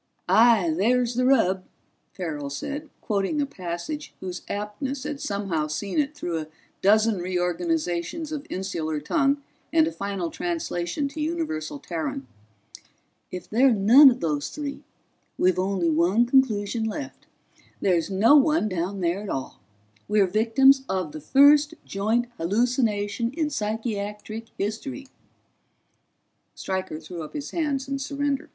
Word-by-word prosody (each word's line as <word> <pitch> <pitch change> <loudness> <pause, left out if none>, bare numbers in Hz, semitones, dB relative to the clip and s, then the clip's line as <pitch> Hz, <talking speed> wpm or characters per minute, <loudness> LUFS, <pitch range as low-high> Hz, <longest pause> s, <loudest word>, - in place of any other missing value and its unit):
"Aye, 205 -3 +5
there's 240 +6 +2
the 250 +1 +1
rub," 190 -8 +3 0.5
Farrell 150 -6 -4
said, 285 - -5
quoting 210 +7 -1
a 285 - +2
passage 185 - -6
whose 180 -1 -6
aptness 260 +7 -4
had 295 -1 -5
somehow 195 -7 -2
seen 190 - -2
it 295 +1 0
through 175 - -3
a 155 - -6 0.3
dozen 215 +1 +4
reorganizations 175 - -2
of 300 0 -5
insular 165 -5 -3
tongue 280 - +1 0.3
and 320 0 +5
a 320 - -2
final 195 - -4
translation 295 - -2
to 305 +2 -6
universal 305 - -2
Terran. 160 -3 -4 1.0
"If 180 -1 -7
they're 255 +4 +4
none 235 +7 +8
of 250 0 -2
those 150 -3 -1
three, 285 -2 -6 0.6
we've 185 0 +2
only 185 -3 +1
one 180 +9 +3
conclusion 230 -4 +2
left. 260 +6 -5 0.5
There's 175 -3 +1
no 210 +8 +5
one 300 -4 +4
down 185 +2 -3
there 175 +3 0
at 210 - -7
all 130 -1 -4 0.5
we're 210 -1 +4
victims 235 +8 +4
of 185 -5 -1
the 155 - -8
first 290 - +5
joint 220 +5 0
hallucination 225 +3 0
in 310 -2 -1
psychiatric 215 -1 -4
history." 225 +7 -4 1.5
Stryker 190 -4 -3
threw 165 +2 -8
up 155 - -8
his 290 -2 -5
hands 285 -5 -1
in 275 0 -2
surrender. 280 0 -2
210 Hz, 135 wpm, -25 LUFS, 180-275 Hz, 1.5 s, none